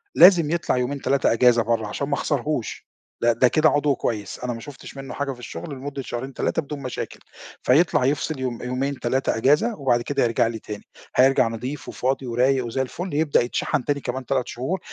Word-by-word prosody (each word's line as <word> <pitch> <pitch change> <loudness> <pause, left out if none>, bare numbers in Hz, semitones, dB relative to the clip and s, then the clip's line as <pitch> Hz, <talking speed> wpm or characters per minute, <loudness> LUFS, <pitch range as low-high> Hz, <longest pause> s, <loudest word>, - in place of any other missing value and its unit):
لازم 170 -4 +7
يطلع 170 -6 0
يومين 135 +3 -2
3 135 -2 +2
أجازة 120 -1 +4
برّا 110 -1 0
عشان 140 +7 -3
ما 145 - -2
اخسرهوش، 145 -3 -2 0.3
ده 120 0 +4
ده 125 +3 +4
كده 155 +5 +4
عضو 145 -2 +2
كويس 105 -5 -3
أنا 125 -1 -3
ما 115 - -7
شُفتش 140 +1 -11
منُّه 135 0 -7
حاجة 140 -1 -2
في 125 - -9
الشُغل 85 -7 -7
لمدة 135 +1 -5
شهرين 130 +2 -5
3 - - 0
بدون 145 -1 -7
مشاكل، 130 -2 -5 0.4
فيطلع 145 -1 +4
يفصل 145 +1 0
يوم 125 -3 -3
يومين 130 +2 -2
3 130 -1 0
أجازة، 150 - +3
وبعد 125 -4 +2
كده 140 +2 0
يرجع 115 -1 +2
لي 115 -1 -4
تاني. 105 -1 -8 0.3
هيرجع 130 -1 +5
نظيف 125 +5 -5
وفاضي 130 +1 -1
ورايق 125 +2 +2
وزي 125 +3 -2
الفل، 170 +6 -4
يبدأ 150 0 +3
يتشحن 120 +1 -1
تاني 145 -1 0
كمان 130 0 -4
3 130 0 0
شهور، 145 +11 -3
130 Hz, 195 wpm, -23 LUFS, 120-145 Hz, 0.4 s, لازم